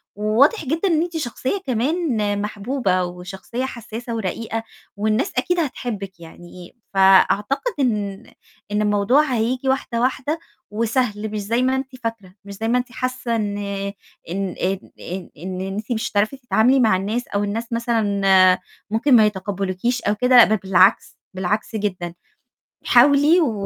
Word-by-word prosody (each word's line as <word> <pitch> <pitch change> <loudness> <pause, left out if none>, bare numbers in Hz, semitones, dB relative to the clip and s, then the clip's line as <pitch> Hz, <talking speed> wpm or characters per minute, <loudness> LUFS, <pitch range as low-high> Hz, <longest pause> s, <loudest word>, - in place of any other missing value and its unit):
وواضح 230 - +2
جدًا 330 +8 0
إن 325 -3 +2
أنتِ 345 -1 -3
شخصية 265 +6 -2
كمان 265 +3 0 0.2
محبوبة، 205 -2 -1
وشخصية 190 +8 -5
حسّاسة 235 -1 -6
ورقيقة، 225 +2 -3 0.3
والناس 215 +4 0
أكيد 355 +7 +1
هتحبِك 210 - -4
يعني، 175 +3 -13 0.2
فأعتقد 200 - +3
إن 210 -6 -1 0.5
إن 210 +1 +1
الموضوع 210 +8 +3
هييجي 250 +4 0
واحدة، 240 -3 -1
واحدة، 265 +5 -1 0.3
وسهل 220 -1 -1
مش 215 - -3
زي 230 +5 0
ما 260 +1 +2
أنتِ 265 0 -4
فاكرة، 215 -5 -5
مش 200 - -8
زي 225 +3 -4
ما 245 +2 +2
أنتِ 245 -1 -3
حاسّة 255 -1 -2
إن 205 -2 -2 0.7
إن 190 +1 -3
إن 190 +1 0 0.2
إن 185 +1 -7
إن 185 +3 -5
أنتِ 200 +5 -5
مش 225 -1 -2
هتعرفي 215 +6 0
تتعاملي 250 +1 +3
مع 220 -6 +4
الناس 220 +6 -3
أو 205 0 -1
الناس 225 +3 -3
مثلًا 225 -4 0
آآ، 185 -1 +6 0.3
ممكن 240 +5 +3
ما 215 -2 +7
يتقبلوكيش 200 +3 -2
أو 205 +1 0
كده، 250 +1 +6
ده 215 - +3
بالعكس، 190 0 +3 0.2
بالعكس 200 +4 -2
جدًا، 185 -5 -3 0.7
حاولي 285 +7 +5
و 215 -9 -1
220 Hz, 145 wpm, -21 LUFS, 195-255 Hz, 0.7 s, ما